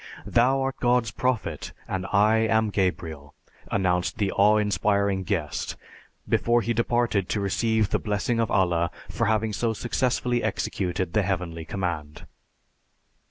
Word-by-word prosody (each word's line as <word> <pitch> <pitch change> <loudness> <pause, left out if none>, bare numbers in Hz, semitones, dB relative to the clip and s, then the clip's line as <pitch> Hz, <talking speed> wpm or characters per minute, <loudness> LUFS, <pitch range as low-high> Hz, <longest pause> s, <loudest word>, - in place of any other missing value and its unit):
'Thou 130 +3 +3
art 135 0 -2
God's 120 -2 +2
Prophet, 130 -4 -2
and 95 0 -3
I 105 +2 +4
am 110 -1 +2
Gabriel,' 80 -7 -2 0.4
announced 90 -2 0
the 100 -2 0
awe 105 +2 +4
inspiring 100 -1 +1
guest 85 -5 -2 0.5
before 120 0 +2
he 120 - 0
departed 115 -4 +1
to 105 - 0
receive 110 +1 +1
the - - +1
blessing 105 +3 -1
of 115 -3 +1
Allah 85 -3 +2 0.2
for - - 0
having 110 0 +1
so 115 +2 0
successfully 120 +1 0
executed 95 -4 -2
the 105 - +3
heavenly 90 -4 -3
command. 80 -5 -4
105 Hz, 135 wpm, -25 LUFS, 90-115 Hz, 0.5 s, I